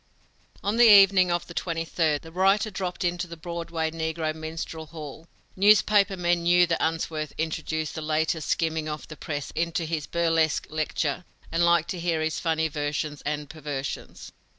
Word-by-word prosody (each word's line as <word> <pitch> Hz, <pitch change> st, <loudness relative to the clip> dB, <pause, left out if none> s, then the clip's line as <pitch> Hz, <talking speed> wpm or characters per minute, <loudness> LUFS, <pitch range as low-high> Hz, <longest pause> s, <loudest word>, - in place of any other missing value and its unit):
On 205 Hz, +3 st, 0 dB
the 240 Hz, 0 st, +7 dB
evening 195 Hz, -2 st, +7 dB
of 175 Hz, 0 st, -1 dB
the 170 Hz, -, -10 dB
twenty 165 Hz, -1 st, -2 dB
third, 155 Hz, -3 st, 0 dB
the 165 Hz, -, -11 dB
writer 195 Hz, +4 st, +2 dB
dropped 185 Hz, -1 st, -4 dB
into 175 Hz, 0 st, -1 dB
the 170 Hz, 0 st, -9 dB
Broadway 165 Hz, -1 st, -3 dB
negro 160 Hz, -1 st, -2 dB
minstrel 160 Hz, 0 st, -6 dB
hall. 155 Hz, 0 st, -9 dB, 0.3 s
Newspaper 200 Hz, 0 st, +4 dB
men 175 Hz, -1 st, +1 dB
knew 175 Hz, +1 st, +5 dB
that 170 Hz, -1 st, -1 dB
Unsworth 160 Hz, -2 st, -2 dB
introduced 160 Hz, 0 st, -2 dB
the 160 Hz, -, -5 dB
latest 155 Hz, 0 st, -1 dB
skimming 160 Hz, -1 st, 0 dB
of 150 Hz, 0 st, -6 dB
the 155 Hz, -, -8 dB
press 145 Hz, -2 st, -5 dB
into 170 Hz, +1 st, -1 dB
his 155 Hz, -2 st, -3 dB
burlesque 165 Hz, -2 st, +1 dB
lecture 155 Hz, 0 st, -1 dB, 0.3 s
and 165 Hz, +1 st, +1 dB
liked 170 Hz, -1 st, +3 dB
to 180 Hz, -, -4 dB
hear 170 Hz, -1 st, 0 dB
his 160 Hz, +1 st, -1 dB
funny 160 Hz, -1 st, 0 dB
versions 150 Hz, 0 st, -3 dB
and 150 Hz, 0 st, -2 dB
perversions. 145 Hz, -3 st, -6 dB
165 Hz, 170 wpm, -26 LUFS, 155-175 Hz, 0.3 s, the